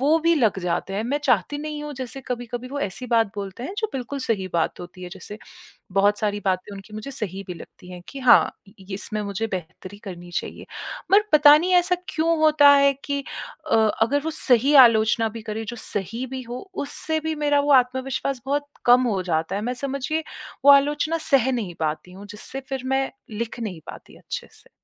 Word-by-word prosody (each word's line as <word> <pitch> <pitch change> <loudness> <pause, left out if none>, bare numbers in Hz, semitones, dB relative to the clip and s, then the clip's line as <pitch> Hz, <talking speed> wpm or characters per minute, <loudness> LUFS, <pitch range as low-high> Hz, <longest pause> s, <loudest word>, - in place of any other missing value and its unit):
वो 300 +4 +4
भी 335 +1 +3
लग 225 -9 +2
जाते 175 +2 -2
हैं। 205 - -1
मैं 280 +4 0
चाहती 250 - +2
नहीं 300 0 -5
हूँ 295 0 -6
जैसे 260 0 -6
कभी-कभी 245 0 -5
वो 285 +1 -5
ऐसी 225 +5 -4
बात 230 -2 +3
बोलते 200 +3 -6
हैं 370 +9 -5
जो 435 - +1
बिल्कुल 270 +2 -4
सही 205 -7 -1
बात 170 0 -1
होती 180 +1 -10
है। 180 - -6
जैसे 195 +3 -9 0.5
बहुत 205 +2 +3
सारी 205 -1 -1
बातें 190 +2 -1
उनकी 195 +2 -12
मुझे 215 +6 -6
सही 195 -5 -3
भी 180 - -4
लगती 180 +2 -13
हैं 180 - -9
कि 275 - -8
हाँ, 255 -2 +6 0.3
ये 190 +1 -10
इसमें 210 +1 -4
मुझे 205 +2 -3
बेहतरी 185 +2 -7
करनी 175 -2 -8
चाहिए। - - -5 0.5
पर 405 +2 +7
पता 295 0 +8
नहीं 360 +4 0
ऐसा 360 0 +4
क्यों 330 +1 +1
होता 305 -2 +6
है 280 0 +5
कि 280 -1 -2 0.5
अ, - - +5 0.3
अगर 260 +6 +3
वो 320 - -1
सही 260 +1 +3
आलोचना 220 0 +2
भी 225 +1 -8
करें 220 0 -5
जो 240 - -5
सही 225 +6 -3
भी 260 - -4
हो 245 +2 -6 0.3
उससे 315 +2 -2
भी 315 0 -3
मेरा 290 -1 +2
वो 290 0 +1
आत्मविश्वास 260 0 +1
बहुत 285 +1 -1 0.2
कम 245 +1 +6
हो 195 -5 0
जाता 165 +1 -1
है। 205 - -2
मैं 245 +2 -1
समझिए 275 +4 -3 0.4
वो 285 - +10
आलोचना 295 +3 +3
सह 265 -1 +4
नहीं 210 -9 -3
पाती 160 +3 -3
हूँ 195 +2 -11
जिससे 215 +6 -5
फ़िर 265 -2 -3
मैं 265 0 0 0.2
लिख 225 +2 -5
नहीं 185 -8 -5
पाती - - -12
अच्छे - - -6
से। - - -17
245 Hz, 205 wpm, -23 LUFS, 200-280 Hz, 0.5 s, वो